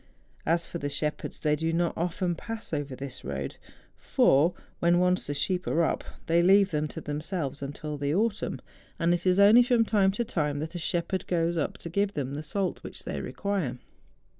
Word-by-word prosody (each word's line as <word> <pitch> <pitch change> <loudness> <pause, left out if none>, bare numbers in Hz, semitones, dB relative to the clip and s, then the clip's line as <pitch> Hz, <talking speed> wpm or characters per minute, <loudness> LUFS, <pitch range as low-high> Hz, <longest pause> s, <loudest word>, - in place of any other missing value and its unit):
As 170 +1 +2
for 170 - -6
the 145 - -2
shep¬ 150 +1 -1
herds, - - -7
they 150 -1 +2
do 160 +2 -1
not 170 +1 0
often 175 +1 -1
pass 225 +3 -7
over 145 -3 -2
this 135 -1 -7
road; 70 0 -4 0.4
for, 155 +6 +3 0.2
when 170 +1 +4
once 180 0 +2
the 145 - -2
sheep 180 +5 -1
are 170 - +2
up, - - 0 0.2
they 170 +1 +3
leave 195 +2 +5
them 150 -1 0
to - - -7
themselves 150 -1 -3
until 145 +1 -5
the 145 +2 0
autumn; 215 +1 0 0.4
and 170 0 +2
it 175 +1 -1
is 185 +1 +4
only 210 +4 +8
from 240 -2 +3
time 200 -3 +3
to 235 +4 -1
time 150 -9 -1
that 155 +3 -4
a 175 - -4
shepherd 175 +2 -2
goes 170 -1 +1
up 155 - -1
to - - -8
give 200 +3 0
them 140 -2 -2
the 145 - -3
salt 185 +5 -2
which - - -8
they - - -4
require. 190 -11 -2
170 Hz, 205 wpm, -28 LUFS, 150-190 Hz, 0.4 s, only